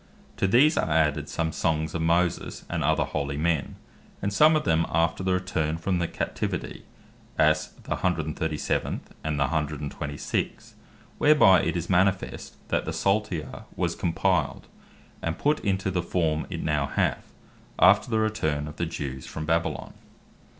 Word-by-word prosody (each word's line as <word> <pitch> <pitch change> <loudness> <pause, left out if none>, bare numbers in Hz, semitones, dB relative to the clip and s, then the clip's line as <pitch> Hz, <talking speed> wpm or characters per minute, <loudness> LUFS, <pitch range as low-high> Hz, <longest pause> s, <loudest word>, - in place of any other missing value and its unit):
To - - +2
these 135 - +5
are - - 0
added 75 -2 +1
some 80 -1 -1
songs 80 -2 -1
of 85 - -2
Moses, 85 +1 0
and - - -1
other - - +2
holy 70 -1 -3
men; 80 -3 0 0.4
and 100 0 -2
some 155 +8 +6
of 155 - +1
them 80 - +2
after 85 +2 +1
the 95 0 +1
return 80 -4 -1
from 90 +2 -1
the 85 - 0
Captivity; - - -4 0.5
as 80 0 +3 0.2
the - - -11
137. 80 -3 -1 0.2
and 75 -2 -1
the - - +4
126. 75 0 -3 0.5
whereby 145 -12 +6
it - - -1
is 85 - -3
manifest 95 +1 0
that - - 0
the - - -3
Psalter 95 -6 -1
was - - 0
compiled, 85 - 0 0.6
and 85 +1 -2
put 150 +1 +1
into 95 -1 -1
the 90 -1 0
form 80 -3 -1
it - - -4
now 75 -2 0
hath, - - -1 0.5
after 100 +6 +5
the 110 - +1
return 80 -10 0
of 75 - -9
the 85 - -1
Jews 70 -5 -5
from 75 - -5
Babylon. 85 +1 -1
85 Hz, 155 wpm, -26 LUFS, 75-95 Hz, 0.6 s, some